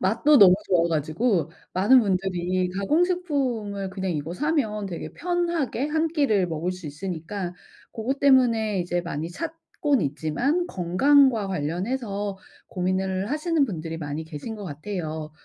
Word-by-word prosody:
맛도 230 Hz, +10 st, +4 dB
너무 185 Hz, -4 st, +9 dB
좋아 170 Hz, -2 st, +3 dB
가지고 165 Hz, -, 0 dB, 0.2 s
많은 205 Hz, +8 st, +6 dB
분들이 185 Hz, -3 st, 0 dB
가공식품을 255 Hz, -, 0 dB
그냥 190 Hz, 0 st, -3 dB
이거 155 Hz, +1 st, -4 dB
사면 225 Hz, -, -1 dB
되게 175 Hz, -3 st, -6 dB
편하게 340 Hz, -7 st, -1 dB
1 315 Hz, +2 st, +1 dB
끼를 275 Hz, -, +2 dB
먹을 165 Hz, +2 st, -2 dB
수 185 Hz, -3 st, -9 dB
있으니까 175 Hz, +4 st, -5 dB, 0.4 s
고것 255 Hz, +5 st, -3 dB
때문에 230 Hz, -7 st, +4 dB
이제 175 Hz, 0 st, -1 dB
많이 165 Hz, -1 st, -4 dB
찾곤 310 Hz, -, -2 dB
있지만 160 Hz, -, 0 dB
건강과 220 Hz, -, +3 dB
관련해서 195 Hz, -, -2 dB, 0.3 s
고민을 190 Hz, +2 st, -1 dB
하시는 310 Hz, 0 st, +1 dB
분들이 165 Hz, -8 st, -5 dB
많이 150 Hz, 0 st, -4 dB
계신 160 Hz, +8 st, -7 dB
것 205 Hz, -, -7 dB
같아요. 155 Hz, -1 st, -5 dB
195 Hz, 300 characters per minute, -25 LUFS, 175-265 Hz, 0.4 s, 너무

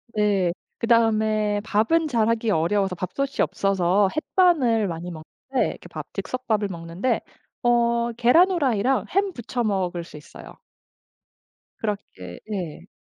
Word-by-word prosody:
네. 200 Hz, -4 st, +2 dB, 0.3 s
그다음에 215 Hz, -3 st, +2 dB
밥은 225 Hz, +10 st, +2 dB
잘하기 230 Hz, -3 st, +1 dB
어려워서 190 Hz, +2 st, +1 dB
밥솥이 225 Hz, +11 st, -2 dB
없어서 195 Hz, 0 st, +2 dB
햇반을 295 Hz, -, +2 dB
많이 170 Hz, 0 st, -5 dB
먹는데 170 Hz, +11 st, -3 dB
그 -, -, -12 dB
밥 -, -, -6 dB
즉석밥을 220 Hz, -5 st, -2 dB
먹는데 170 Hz, +6 st, -2 dB, 0.4 s
어 235 Hz, 0 st, +2 dB
계란 245 Hz, +10 st, +5 dB
프라이랑 265 Hz, -, +1 dB
햄 390 Hz, 0 st, +1 dB
부쳐 240 Hz, -1 st, -3 dB
먹을 185 Hz, -5 st, -1 dB
수 160 Hz, -, -12 dB
있어요. 150 Hz, -, -13 dB, 1.2 s
그렇게 200 Hz, -, -5 dB
예. 175 Hz, -3 st, -5 dB
215 Hz, 265 characters per minute, -24 LUFS, 185-240 Hz, 1.2 s, 계란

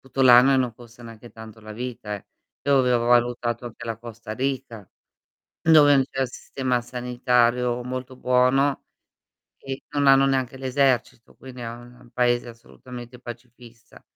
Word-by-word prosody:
tutto 135 Hz, 0 st, -3 dB
l'anno 125 Hz, +1 st, +7 dB
e -, -, +3 dB
non 125 Hz, -2 st, 0 dB
costa 120 Hz, +1 st, -16 dB
neanche 115 Hz, 0 st, -12 dB
tanto 110 Hz, 0 st, -12 dB
la 110 Hz, 0 st, -10 dB
vita, 115 Hz, -2 st, -6 dB
eh. 100 Hz, -, -9 dB, 0.4 s
Io 140 Hz, 0 st, +3 dB
avevo 125 Hz, -2 st, +2 dB
valutato 120 Hz, 0 st, +1 dB
anche 120 Hz, 0 st, -10 dB
la 115 Hz, -2 st, -4 dB
Costa 115 Hz, -1 st, -9 dB
Rica 120 Hz, -5 st, -4 dB, 0.7 s
dove 150 Hz, -3 st, +6 dB
n 135 Hz, -, +3 dB
c'è 135 Hz, 0 st, -1 dB
sistema 125 Hz, 0 st, -3 dB
sanitario 125 Hz, 0 st, 0 dB
molto 130 Hz, +1 st, -6 dB
buono 125 Hz, +3 st, +2 dB, 0.7 s
e 135 Hz, 0 st, -7 dB
non 145 Hz, -1 st, 0 dB
hanno 135 Hz, 0 st, +6 dB
neanche 135 Hz, -1 st, -1 dB
l'esercito, 130 Hz, -3 st, -1 dB
quindi 130 Hz, -1 st, -12 dB
è 115 Hz, -, -5 dB
un 120 Hz, +1 st, -13 dB
paese 120 Hz, 0 st, +1 dB
assolutamente 120 Hz, +1 st, -12 dB
pacifista. 120 Hz, 0 st, -13 dB
125 Hz, 150 wpm, -23 LUFS, 120-130 Hz, 0.7 s, l'anno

